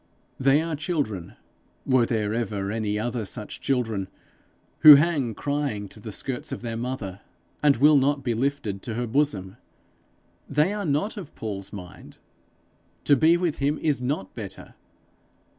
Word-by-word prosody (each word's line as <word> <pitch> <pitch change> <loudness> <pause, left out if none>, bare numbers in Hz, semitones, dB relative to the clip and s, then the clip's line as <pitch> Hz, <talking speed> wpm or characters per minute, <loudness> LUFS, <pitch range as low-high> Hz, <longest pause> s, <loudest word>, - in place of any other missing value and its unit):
They 140 +4 +4
are 165 -1 -3
children 145 - -3 0.5
were 130 -3 +3
there 110 -3 -1
ever 105 -4 -2
any 105 -1 -1
other 120 +1 -2
such 105 +1 -5
children? 115 -7 -1 0.7
who 150 -1 +12
hang 140 -7 +1
crying 140 -8 -2
to 105 - -15
the 105 +1 -8
skirts 125 +4 -5
of - - -5
their 115 -1 -3
mother, 115 -6 -5 0.4
and 145 -3 +4
will 150 +4 +6
not 140 +1 +1
be 120 - 0
lifted 120 -5 -2
to 110 - -5
her 120 +1 -1
bosom. 110 -6 -1 0.9
They 150 +7 +2
are 205 -1 -3
not 155 +11 0
of 185 -8 -9
Paul's 100 -3 -5
mind: 90 -4 -11 0.9
to 145 - +5
be 160 +4 +4
with 175 -3 -1
Him 145 +2 +1
is 145 -5 0
not 125 -7 -3
better! - - -9
125 Hz, 155 wpm, -25 LUFS, 105-145 Hz, 0.9 s, who